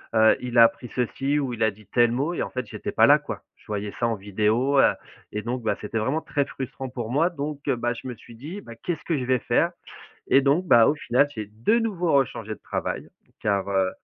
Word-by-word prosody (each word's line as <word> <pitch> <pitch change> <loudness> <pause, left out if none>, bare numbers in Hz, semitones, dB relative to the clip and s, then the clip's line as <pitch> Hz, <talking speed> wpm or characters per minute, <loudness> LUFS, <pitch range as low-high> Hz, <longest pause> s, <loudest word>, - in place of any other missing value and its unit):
heu 110 0 +6
il 125 -1 -3
a 115 - +10
appris 120 +1 -2
ceci 135 +4 0
ou 130 -4 -2
il 115 - -1
a 110 - +3
dit 105 +2 -18
tel 120 0 +3
mot 140 +8 -1
et - - -2
en - - -5
fait, 125 -3 -4
j'étais - - -5
pas - - +5
là - - +8
quoi». - - -7
Je - - -25
voyais 105 -1 -3
ça 120 - +2
en 115 - 0
vidéo, 110 +7 +1
heu - - +6 0.4
et 105 - -3
donc, 120 +2 -4
bah 110 - 0
c'était 110 +1 -3
vraiment 130 +8 0
très 145 -2 0
frustrant 130 -1 -6
pour 120 -3 -5
moi, 160 +6 +3
donc 145 -3 -5
heu, 130 - +2
bah, 120 +1 -1
je 120 - -11
me 125 - -4
suis 115 +1 -15
dit: 155 - -7
«Bah 115 - -11
qu'est-ce 160 +7 -4
que 165 -4 0
je 130 - -2
vais 130 -1 +2
faire?» - - +1 0.6
et 135 - +6
donc, 145 +7 +2
bah 115 -8 +7
au - - +3
final, 145 -1 +2
j'ai 110 - -4
de 120 - +2
nouveau 190 -7 -1
rechangé 115 -5 0
de - - -21
travail, - - -4 0.3
car, 100 -1 0
heu, 95 -1 +1
125 Hz, 250 wpm, -25 LUFS, 110-140 Hz, 0.6 s, a